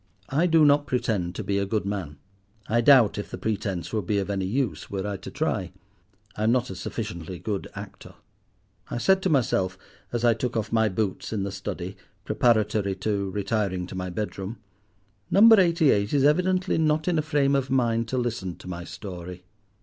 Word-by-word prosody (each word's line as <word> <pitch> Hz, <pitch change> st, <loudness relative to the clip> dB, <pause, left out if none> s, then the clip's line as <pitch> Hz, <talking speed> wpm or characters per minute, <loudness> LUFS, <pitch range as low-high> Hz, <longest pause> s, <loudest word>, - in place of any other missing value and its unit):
I 155 Hz, +6 st, +2 dB
do 165 Hz, -2 st, +5 dB
not 145 Hz, 0 st, +4 dB
pretend 100 Hz, -8 st, -1 dB
to -, -, -4 dB
be 100 Hz, 0 st, 0 dB
a 100 Hz, -, 0 dB
good 105 Hz, 0 st, -1 dB
man. 95 Hz, -8 st, -4 dB, 0.5 s
I 115 Hz, +2 st, +2 dB
doubt 120 Hz, -6 st, +6 dB
if 105 Hz, -, -5 dB
the -, -, -6 dB
pretence 100 Hz, -4 st, -3 dB
would 105 Hz, -5 st, -2 dB
be 105 Hz, -, +1 dB
of 100 Hz, 0 st, -1 dB
any 95 Hz, -2 st, -1 dB
use 125 Hz, +4 st, -2 dB
were 95 Hz, -1 st, -3 dB
I 105 Hz, -1 st, -2 dB
to -, -, -9 dB
try: 110 Hz, -, -2 dB, 0.6 s
I 105 Hz, -, -3 dB
am 110 Hz, -, +4 dB
not 125 Hz, -3 st, +1 dB
a -, -, -6 dB
sufficiently 90 Hz, -3 st, -5 dB
good 100 Hz, +1 st, -4 dB
actor. -, -, -10 dB, 0.7 s
I -, -, -3 dB
said 190 Hz, +9 st, +3 dB
to 190 Hz, -, 0 dB
myself, 95 Hz, -, +1 dB, 0.3 s
as 120 Hz, 0 st, -1 dB
I 120 Hz, -, +6 dB
took 120 Hz, +1 st, -3 dB
off 110 Hz, -1 st, -2 dB
my 110 Hz, -1 st, +3 dB
boots 95 Hz, 0 st, -2 dB
in 105 Hz, -3 st, -1 dB
the 100 Hz, -, -3 dB
study, -, -, -5 dB, 0.3 s
preparatory 110 Hz, -4 st, +2 dB
to 100 Hz, 0 st, -2 dB
retiring 100 Hz, -2 st, -1 dB
to 95 Hz, -, -9 dB
my 90 Hz, 0 st, -3 dB
bedroom—"Number 100 Hz, -, +1 dB
Eighty 170 Hz, -5 st, +4 dB
eight 100 Hz, +6 st, +1 dB
is 140 Hz, -, +3 dB
evidently 180 Hz, +5 st, +2 dB
not 155 Hz, 0 st, +1 dB
in 170 Hz, -3 st, +2 dB
a -, -, +3 dB
frame 145 Hz, -3 st, +1 dB
of 135 Hz, -1 st, 0 dB
mind 115 Hz, -3 st, +1 dB
to 130 Hz, -, -2 dB
listen 115 Hz, -8 st, -2 dB
to -, -, -13 dB
my 90 Hz, -1 st, -5 dB
story. 90 Hz, -1 st, -8 dB
110 Hz, 195 wpm, -26 LUFS, 95-135 Hz, 0.7 s, doubt